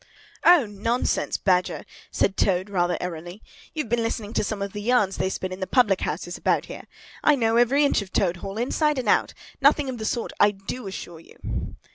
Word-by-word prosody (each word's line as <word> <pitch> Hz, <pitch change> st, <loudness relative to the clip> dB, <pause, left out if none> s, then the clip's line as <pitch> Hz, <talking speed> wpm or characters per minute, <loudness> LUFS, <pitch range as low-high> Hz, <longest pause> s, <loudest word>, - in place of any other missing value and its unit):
"O, 345 Hz, -7 st, +7 dB
nonsense! 220 Hz, +4 st, -1 dB
Badger," 180 Hz, -2 st, 0 dB, 0.2 s
said 195 Hz, -, 0 dB
Toad, 190 Hz, +1 st, +1 dB
rather 175 Hz, -2 st, +1 dB
airily. 175 Hz, +3 st, -6 dB, 0.3 s
"You've 305 Hz, -5 st, -2 dB
been 240 Hz, 0 st, +1 dB
listening 225 Hz, -1 st, -3 dB
to -, -, +1 dB
some 210 Hz, 0 st, -3 dB
of 200 Hz, 0 st, -4 dB
the 205 Hz, -, -5 dB
yarns 210 Hz, -4 st, +2 dB
they 190 Hz, -, 0 dB
spin 185 Hz, -1 st, -4 dB
in 185 Hz, -, -6 dB
the 190 Hz, -, -3 dB
public 210 Hz, -7 st, +3 dB
houses -, -, -4 dB
about -, -, +1 dB
here. -, -, -9 dB, 0.4 s
I 300 Hz, -, +5 dB
know 230 Hz, -3 st, +1 dB
every 265 Hz, +5 st, +4 dB
inch 280 Hz, -, +2 dB
of 195 Hz, -2 st, -9 dB
Toad 180 Hz, -3 st, +1 dB
Hall, 195 Hz, +3 st, -7 dB
inside 295 Hz, +5 st, +1 dB
and 255 Hz, -, -3 dB
out. -, -, +2 dB, 0.3 s
Nothing 285 Hz, 0 st, +4 dB
of 250 Hz, -2 st, -5 dB
the 220 Hz, -, -4 dB
sort, 235 Hz, +1 st, -2 dB
I 205 Hz, -, +6 dB
do 205 Hz, +3 st, -7 dB
assure 175 Hz, -3 st, -7 dB
you!" 165 Hz, -, -7 dB
210 Hz, 205 wpm, -24 LUFS, 190-245 Hz, 0.4 s, O